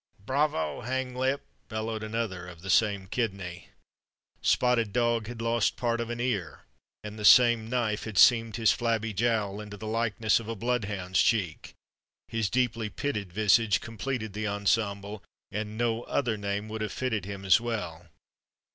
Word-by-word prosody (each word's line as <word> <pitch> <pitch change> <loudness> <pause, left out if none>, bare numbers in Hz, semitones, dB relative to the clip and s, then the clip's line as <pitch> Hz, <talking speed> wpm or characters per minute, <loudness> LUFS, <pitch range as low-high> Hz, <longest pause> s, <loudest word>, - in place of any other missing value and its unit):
"Bravo, 130 - 0
Hanglip!" 130 +2 -1 0.3
bellowed 110 0 -3
another 110 -5 -3
of 85 -1 -12
the 95 - -1
same 100 -3 +3
kidney. 95 -5 -4 0.7
Spotted 120 -4 +2
Dog 120 -2 +1
had 115 -1 -6
lost 115 -1 +1
part 120 -1 0
of 115 - -4
an 120 0 -4
ear, 100 -11 -2 0.4
and 105 +1 -7
the - - -5
same 115 0 +6
knife 115 -4 -1
had 110 -3 -6
seamed 115 0 +6
his 110 -1 +4
flabby 115 -2 -1
jowl 105 -1 0
into 105 -1 -9
the 110 - -8
likeness 110 -1 +1
of 115 - -9
a 115 - -3
bloodhound's 105 -5 0
cheek; 95 -9 0 0.5
his 115 -3 -1
deeply 120 -3 0
pitted 105 -6 -3
visage 105 +2 +3
completed 115 -1 -4
the 105 +1 -3
ensemble, 100 0 -1 0.3
and 105 +1 -4
no 115 -1 0
other 120 -6 0
name 100 0 -3
would 110 0 -5
have 110 - -2
fitted 110 -7 -2
him 100 -1 -7
as 95 +4 +5
well. 90 -8 -4
110 Hz, 155 wpm, -28 LUFS, 100-120 Hz, 0.7 s, same